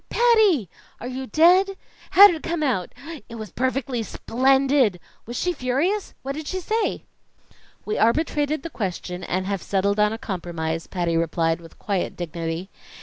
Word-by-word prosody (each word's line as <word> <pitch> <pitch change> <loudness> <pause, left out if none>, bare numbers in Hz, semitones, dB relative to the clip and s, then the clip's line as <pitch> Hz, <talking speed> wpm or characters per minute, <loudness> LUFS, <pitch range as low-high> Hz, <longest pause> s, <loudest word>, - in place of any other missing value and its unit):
"Patty!" 435 - +4 0.3
"Are - - -8
you 260 +1 -5
dead?" 370 +6 +4 0.4
"How'd 405 0 +11
it 320 -3 -4
come 335 -2 -2
out?" 230 -11 0 0.4
"It 230 - -8
was 215 -5 -7
perfectly 255 -1 -1
splendid!" 260 -2 +2 0.3
"Was 240 - -5
she 360 - 0
furious?" 305 +10 -1
"What 270 - -3
did 300 +1 -6
she 375 - -2
say?" 440 +5 -1 0.8
"We 430 - -2
arbitrated 295 +4 +1
the 335 - -6
question 180 -3 -4
and 185 +1 -2
have 195 -2 -2
settled 200 +1 0
on 210 0 +4
a 225 - -3
compromise," 165 -5 -4
Patty 175 -3 -1
replied 165 0 0
with 165 - -15
quiet 195 -3 -2
dignity. 170 +1 -4
245 Hz, 155 wpm, -23 LUFS, -, 0.8 s, How'd